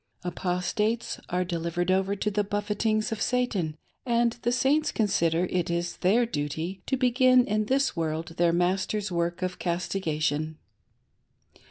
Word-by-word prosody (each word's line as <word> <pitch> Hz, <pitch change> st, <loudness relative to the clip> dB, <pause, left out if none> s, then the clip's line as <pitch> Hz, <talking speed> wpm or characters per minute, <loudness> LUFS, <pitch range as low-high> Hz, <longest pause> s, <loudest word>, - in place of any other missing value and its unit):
Apostates 180 Hz, +6 st, -1 dB
are 180 Hz, 0 st, +1 dB
delivered 170 Hz, +1 st, -1 dB
over 190 Hz, +1 st, +1 dB
to 210 Hz, +1 st, -1 dB
"the 205 Hz, +1 st, +1 dB
buffetings 210 Hz, +2 st, -1 dB
of 220 Hz, -, -3 dB
Satan," 205 Hz, -11 st, 0 dB, 0.3 s
and 235 Hz, -1 st, +2 dB
the 240 Hz, -, +1 dB
Saints 275 Hz, +5 st, +2 dB
consider 175 Hz, -5 st, +1 dB
it 180 Hz, -2 st, 0 dB
is 170 Hz, 0 st, -2 dB
their 220 Hz, +7 st, +3 dB
duty 165 Hz, -1 st, -3 dB
to 265 Hz, -, +1 dB
begin 255 Hz, 0 st, +4 dB
in 215 Hz, +1 st, 0 dB
this 270 Hz, +4 st, +1 dB
world 160 Hz, -1 st, -2 dB
their 170 Hz, 0 st, +4 dB
master's 190 Hz, +3 st, 0 dB
work 170 Hz, +1 st, -1 dB
of 185 Hz, 0 st, -3 dB
castigation. 160 Hz, -4 st, -1 dB
190 Hz, 140 wpm, -27 LUFS, 170-220 Hz, 0.3 s, begin